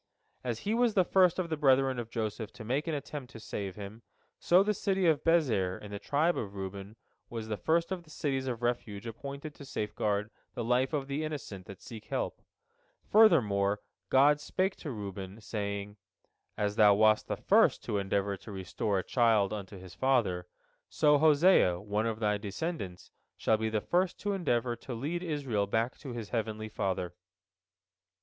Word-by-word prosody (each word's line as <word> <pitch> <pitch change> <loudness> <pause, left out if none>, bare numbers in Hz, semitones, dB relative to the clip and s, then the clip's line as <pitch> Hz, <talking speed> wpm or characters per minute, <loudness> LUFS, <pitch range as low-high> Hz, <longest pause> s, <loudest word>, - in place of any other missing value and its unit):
As 120 -3 -3
he 210 - -1
was 235 -2 +2
the 185 -3 +4
first 185 -2 +4
of 175 -3 -2
the - - +2
brethren 135 -3 +3
of 115 -1 -5
Joseph 110 -1 -3
to 105 - -9
make 135 +8 -1
an 160 - 0
attempt 140 -2 -6
to 115 - -9
save 100 -3 -5
him, 105 +2 -8 0.4
so 180 +3 +5
the 210 +1 +1
city 195 -2 0
of 160 -4 +3
Bezer 120 - +2
in 105 - -10
the 100 - -5
tribe 155 +9 +1
of 100 -3 -5
Reuben 100 +2 -6 0.3
was 115 -2 -5
the 105 - 0
first 165 - +1
of 185 -2 -2
the 165 - -21
cities 135 -4 -2
of 120 -2 -3
refuge 120 -4 -2
appointed 140 +6 -7
to 145 - -12
safeguard 105 -4 -2 0.2
the 120 - -2
life 125 +3 +2
of 145 -3 -1
the 140 +3 -2
innocent 135 -12 -6
that 100 - -11
seek 110 -2 -9
help. - - -3 0.7
Furthermore 105 - +5 0.3
God 145 +3 +5
spake 185 +5 -1
to 155 - -6
Reuben, 100 -3 -6
saying: 100 -1 -4 0.6
"As 105 0 -1
thou 105 -2 +7
wast 110 +1 +4
the - - -2
first - - +3
to 105 - -1
endeavor 100 0 0
to 110 - -11
restore 100 +2 -2
a 95 - -1
child 110 -5 +3
unto 100 -1 -6
his 90 -1 -11
father, 100 -7 +1 0.4
so 150 -2 +4
Hosea, 155 - +5
one 105 +3 -1
of 110 -1 -3
thy 105 -2 +1
descendants, 100 - -5 0.3
shall 110 - +2
be 110 0 -1
the 110 -1 0
first 180 - 0
to 205 -1 -1
endeavor 125 -10 0
to 120 +1 -7
lead 155 +9 -3
Israel 135 - -1
back 115 +4 -1
to 140 - -8
his 115 -4 -6
heavenly 110 -2 -3
Father." 95 -4 -2
115 Hz, 185 wpm, -31 LUFS, 100-150 Hz, 0.7 s, thou